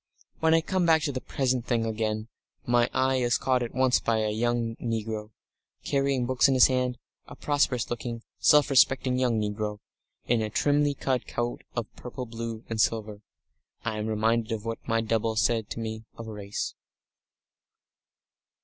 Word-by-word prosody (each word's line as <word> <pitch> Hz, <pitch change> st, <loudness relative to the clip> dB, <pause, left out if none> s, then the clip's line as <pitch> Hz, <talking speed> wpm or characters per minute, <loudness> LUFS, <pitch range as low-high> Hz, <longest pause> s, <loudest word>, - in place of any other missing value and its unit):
When 160 Hz, 0 st, +4 dB
I 165 Hz, -, +4 dB
come 180 Hz, +1 st, 0 dB
back 160 Hz, -1 st, +4 dB
to 145 Hz, -, 0 dB
the 130 Hz, -1 st, -4 dB
present 130 Hz, -3 st, -1 dB
thing 115 Hz, -2 st, +1 dB
again, 110 Hz, -1 st, -2 dB, 0.4 s
my 120 Hz, 0 st, +3 dB
eye 130 Hz, 0 st, +2 dB
is 120 Hz, -1 st, +2 dB
caught 130 Hz, -1 st, +1 dB
at 120 Hz, -, -4 dB
once 130 Hz, -1 st, +3 dB
by 115 Hz, -1 st, +1 dB
a 110 Hz, -1 st, 0 dB
young 115 Hz, +1 st, 0 dB
negro, 110 Hz, -2 st, -3 dB, 0.5 s
carrying 135 Hz, -2 st, +1 dB
books 125 Hz, 0 st, +3 dB
in 135 Hz, -, +2 dB
his 130 Hz, -, +8 dB
hand, 125 Hz, -1 st, +1 dB, 0.3 s
a -, -, -10 dB
prosperous 140 Hz, -5 st, +1 dB
looking, 120 Hz, -1 st, -4 dB, 0.2 s
self 150 Hz, -1 st, +5 dB
respecting 130 Hz, -1 st, +4 dB
young 120 Hz, -3 st, +2 dB
negro, 105 Hz, 0 st, -2 dB, 0.5 s
in 120 Hz, -1 st, +2 dB
a 110 Hz, -, -1 dB
trimly 145 Hz, +5 st, +2 dB
cut 130 Hz, -2 st, -1 dB
coat 120 Hz, 0 st, -3 dB
of 120 Hz, -2 st, -1 dB
purple 125 Hz, +1 st, -7 dB
blue 115 Hz, -1 st, -6 dB
and 110 Hz, -1 st, 0 dB
silver. 105 Hz, -2 st, -1 dB, 0.6 s
I 110 Hz, -2 st, -2 dB
am 105 Hz, -, -2 dB
reminded 110 Hz, +1 st, +1 dB
of 110 Hz, -1 st, -3 dB
what 115 Hz, 0 st, -3 dB
my 115 Hz, -1 st, +2 dB
double 110 Hz, 0 st, 0 dB
said 110 Hz, 0 st, +1 dB
to -, -, -5 dB
me 110 Hz, 0 st, -5 dB
of 115 Hz, -, -7 dB
race. 105 Hz, -2 st, -4 dB
115 Hz, 170 wpm, -27 LUFS, 110-130 Hz, 0.6 s, his